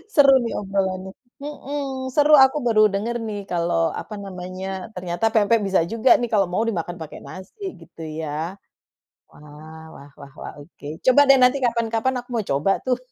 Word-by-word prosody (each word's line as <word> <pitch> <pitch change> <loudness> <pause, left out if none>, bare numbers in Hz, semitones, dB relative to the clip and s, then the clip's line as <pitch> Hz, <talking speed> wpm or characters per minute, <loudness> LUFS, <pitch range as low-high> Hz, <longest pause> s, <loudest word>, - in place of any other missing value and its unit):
Seru 280 -2 +7
nih 230 - -3
obrolannya, 190 -1 -2 0.3
mhm, 280 -2 -5
seru 300 +1 +4
aku 265 +3 -2
baru 215 -2 +4
denger 230 +4 -2
nih 205 -1 -4
kalo 170 -1 -1 0.3
apa 215 - -10
namanya 185 0 -7 0.3
ternyata 180 +2 -3
pempek 225 +1 +3
bisa 190 -3 +2
juga 230 +3 +1
nih 240 - -2
kalo 200 -2 +4
mau 220 - +1
dimakan 175 -3 -4
pake 155 - -8
nasi 190 - -11 0.2
gitu - - -14 0.2
ya. 155 - -4 1.0
Wah 155 +2 -13
wah 140 +1 -14
wah 140 -1 -12
wah, - - -7
oke, 145 0 -14 0.2
coba 255 +2 +6
deh 275 - +7
nanti 250 +2 +4
kapan-kapan 230 +1 0
aku 245 - -9
mau 225 - 0
coba 145 +8 +2
tuh. 250 -1 +1
205 Hz, 170 wpm, -22 LUFS, 175-250 Hz, 1.0 s, Seru